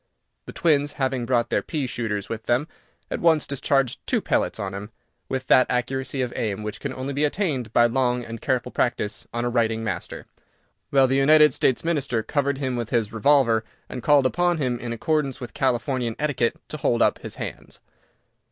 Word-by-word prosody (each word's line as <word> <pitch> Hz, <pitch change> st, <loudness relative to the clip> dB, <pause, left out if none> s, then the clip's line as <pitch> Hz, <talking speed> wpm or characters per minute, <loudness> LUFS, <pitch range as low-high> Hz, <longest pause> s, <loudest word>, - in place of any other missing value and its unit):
The -, -, -6 dB
twins, 145 Hz, -3 st, +2 dB
having 130 Hz, -3 st, -1 dB
brought 120 Hz, -2 st, +1 dB
their -, -, +2 dB
pea 150 Hz, -4 st, -3 dB
shooters 110 Hz, -5 st, -3 dB
with 110 Hz, -1 st, -6 dB
them, 125 Hz, +6 st, +1 dB, 0.4 s
at -, -, -2 dB
once 160 Hz, -3 st, +3 dB
discharged 135 Hz, -2 st, 0 dB
two -, -, +2 dB
pellets -, -, 0 dB
on 95 Hz, -1 st, -4 dB
him, 100 Hz, +2 st, -6 dB, 0.4 s
with 130 Hz, 0 st, -2 dB
that 130 Hz, -, +5 dB
accuracy 130 Hz, +1 st, -1 dB
of 125 Hz, -, -4 dB
aim 105 Hz, -2 st, -2 dB
which 105 Hz, -1 st, -5 dB
can 140 Hz, -, -4 dB
only 130 Hz, +2 st, -4 dB
be 145 Hz, +2 st, 0 dB
attained 145 Hz, -, -1 dB
by 120 Hz, -, +5 dB
long 125 Hz, 0 st, +1 dB
and 115 Hz, -1 st, -8 dB
careful 125 Hz, -2 st, -1 dB
practice 105 Hz, -4 st, -1 dB
on 120 Hz, 0 st, -2 dB
a -, -, +1 dB
writing 115 Hz, -2 st, +1 dB
master, 95 Hz, -6 st, -5 dB, 0.6 s
while 135 Hz, -1 st, +5 dB
the 135 Hz, +1 st, +1 dB
United 150 Hz, +2 st, +6 dB
States 130 Hz, -, +1 dB
Minister 140 Hz, -9 st, 0 dB
covered 140 Hz, +1 st, 0 dB
him 130 Hz, -2 st, -2 dB
with 120 Hz, -2 st, -3 dB
his 115 Hz, -3 st, 0 dB
revolver, 115 Hz, -1 st, +3 dB, 0.2 s
and 125 Hz, -, -6 dB
called 145 Hz, -1 st, +4 dB
upon 175 Hz, +5 st, +2 dB
him, 125 Hz, -5 st, -1 dB
in 120 Hz, -, -5 dB
accordance 140 Hz, +2 st, -1 dB
with 120 Hz, -3 st, -8 dB
Californian 125 Hz, -2 st, 0 dB
etiquette, 140 Hz, -6 st, 0 dB
to 155 Hz, -, -5 dB
hold 120 Hz, -5 st, +2 dB
up -, -, +2 dB
his -, -, -8 dB
hands! -, -, -7 dB
130 Hz, 190 wpm, -24 LUFS, 115-140 Hz, 0.6 s, United